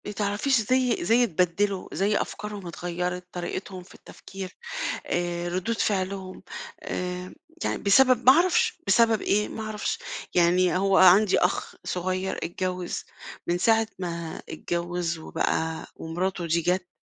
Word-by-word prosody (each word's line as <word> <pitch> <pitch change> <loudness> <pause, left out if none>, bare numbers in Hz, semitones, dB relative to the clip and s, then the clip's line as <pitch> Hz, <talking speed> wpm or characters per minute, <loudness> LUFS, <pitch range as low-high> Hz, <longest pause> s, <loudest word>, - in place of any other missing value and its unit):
ما 205 - -4
تعرفيش 210 +6 +1
زي 250 -2 +1
زي 230 +6 +4
اتبدّلوا، 185 0 0
زي 205 +2 +1
أفكارهم 210 -3 -5
اتغيّرت، 180 +1 -3
طريقتهم 185 +1 -5
في 185 - -17
التفكير 190 -1 -10 0.5
آآ، 175 0 -1
ردود 185 +6 -2
فعلهم 190 -1 -2 0.4
آآ، 180 0 -4 0.3
يعني - - 0
بسبب 250 +4 +5
ما 260 - +11
اعرفش، 350 +4 +3
بسبب 230 -2 +4
إيه؟ 210 +1 +1
ما 220 - -6
اعرفش 215 -1 -3 0.4
يعني 180 +1 +4
هو 195 +1 +3
عندي 190 +2 +7
أخ 180 - 0
صغيّر 185 +1 -2
اتجوّز، 180 0 -3 0.4
من 175 +1 +1
ساعة 225 +4 +3
ما 170 -3 -5
اتجوّز 170 -1 -2
وبقى 160 0 -2
ومراته 175 +2 -3
دي 170 +1 +2
جَت 180 +1 0
185 Hz, 130 wpm, -26 LUFS, 175-210 Hz, 0.5 s, ما